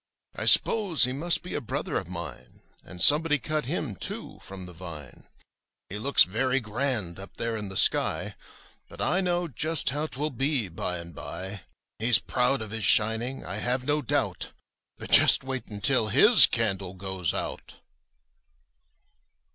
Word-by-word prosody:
'T -, -, -4 dB
s'pose 200 Hz, -10 st, +4 dB
he 125 Hz, 0 st, +1 dB
must 170 Hz, +5 st, -1 dB
be 180 Hz, -, -8 dB
a -, -, -3 dB
brother 115 Hz, -, -5 dB
of -, -, -2 dB
mine, -, -, -9 dB, 0.2 s
And 90 Hz, -, -12 dB
somebody 150 Hz, +1 st, +4 dB
cut 155 Hz, +4 st, -3 dB
hiniy 130 Hz, -, -5 dB
too, -, -, -6 dB
from 95 Hz, -1 st, -10 dB
the 90 Hz, -, -11 dB
vine. 80 Hz, -7 st, -11 dB, 0.6 s
''He 105 Hz, +2 st, -5 dB
looks 140 Hz, +3 st, +5 dB
very 130 Hz, +7 st, -1 dB
grand 110 Hz, -6 st, -3 dB
up 95 Hz, -, -11 dB
there 115 Hz, -1 st, -2 dB
in 105 Hz, -2 st, -5 dB
the 95 Hz, -, -4 dB
sky; -, -, +2 dB, 0.6 s
But -, -, -14 dB
I 185 Hz, -, 0 dB
know 175 Hz, -1 st, -1 dB
just 155 Hz, 0 st, 0 dB
how 150 Hz, +3 st, -3 dB
'twill 150 Hz, +2 st, -4 dB
be, 135 Hz, -4 st, -1 dB
by 90 Hz, +1 st, -3 dB
and 85 Hz, 0 st, -9 dB
by. 95 Hz, +5 st, -7 dB, 0.4 s
''He's 115 Hz, -1 st, +5 dB
proud 125 Hz, +2 st, 0 dB
of 105 Hz, -, -13 dB
his 110 Hz, -, -3 dB
shining, 110 Hz, +3 st, +2 dB
I 95 Hz, +4 st, -5 dB
have 125 Hz, +1 st, -2 dB
no 150 Hz, +2 st, 0 dB
doubt, 125 Hz, -, -2 dB, 0.4 s
But -, -, -9 dB
just -, -, +7 dB
wait 130 Hz, -3 st, -5 dB
until 110 Hz, +3 st, +1 dB
his 215 Hz, -, +7 dB
candle 95 Hz, -5 st, -2 dB
goes 95 Hz, -3 st, -4 dB
out!" -, -, -6 dB
120 Hz, 165 wpm, -26 LUFS, 95-145 Hz, 0.6 s, just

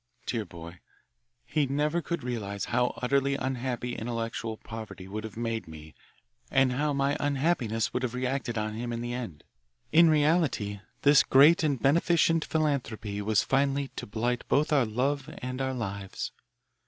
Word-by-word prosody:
Dear 115 Hz, -3 st, -2 dB
boy, 85 Hz, -1 st, -10 dB, 0.7 s
he 150 Hz, -, +1 dB
never 150 Hz, +5 st, 0 dB
could 170 Hz, -4 st, -3 dB
realise 105 Hz, -5 st, -3 dB
how 125 Hz, +1 st, +2 dB
utterly 140 Hz, +2 st, +2 dB
unhappy 125 Hz, -2 st, -2 dB
intellectual 115 Hz, -1 st, -3 dB
poverty 110 Hz, -5 st, -8 dB
would 105 Hz, +3 st, -5 dB
have 110 Hz, -1 st, -8 dB
made 115 Hz, -3 st, -2 dB
me 80 Hz, -1 st, -11 dB, 0.6 s
and 135 Hz, -1 st, +3 dB
how 145 Hz, +3 st, 0 dB
my 140 Hz, 0 st, +1 dB
unhappiness 135 Hz, -6 st, 0 dB
would 125 Hz, -, -1 dB
have 125 Hz, -1 st, -2 dB
reacted 125 Hz, -2 st, -2 dB
on 105 Hz, 0 st, -2 dB
him 120 Hz, +2 st, -4 dB
in 115 Hz, 0 st, -3 dB
the 120 Hz, 0 st, -3 dB
end. 115 Hz, -12 st, -6 dB, 0.5 s
In 165 Hz, +1 st, +7 dB
reality 150 Hz, -, +2 dB, 0.2 s
this 145 Hz, 0 st, +7 dB
great 145 Hz, +6 st, +6 dB
and 145 Hz, -5 st, +1 dB
beneficent 165 Hz, +4 st, +3 dB
philanthropy 120 Hz, -9 st, -1 dB
was 105 Hz, 0 st, +2 dB
finally 140 Hz, 0 st, +1 dB
to -, -, -7 dB
blight 120 Hz, +3 st, -1 dB
both 150 Hz, +2 st, +2 dB
our 140 Hz, -4 st, +4 dB
love 130 Hz, +5 st, -1 dB
and 130 Hz, +1 st, -3 dB
our 130 Hz, 0 st, -1 dB
lives. 100 Hz, -4 st, -4 dB
125 Hz, 155 wpm, -28 LUFS, 110-140 Hz, 0.7 s, In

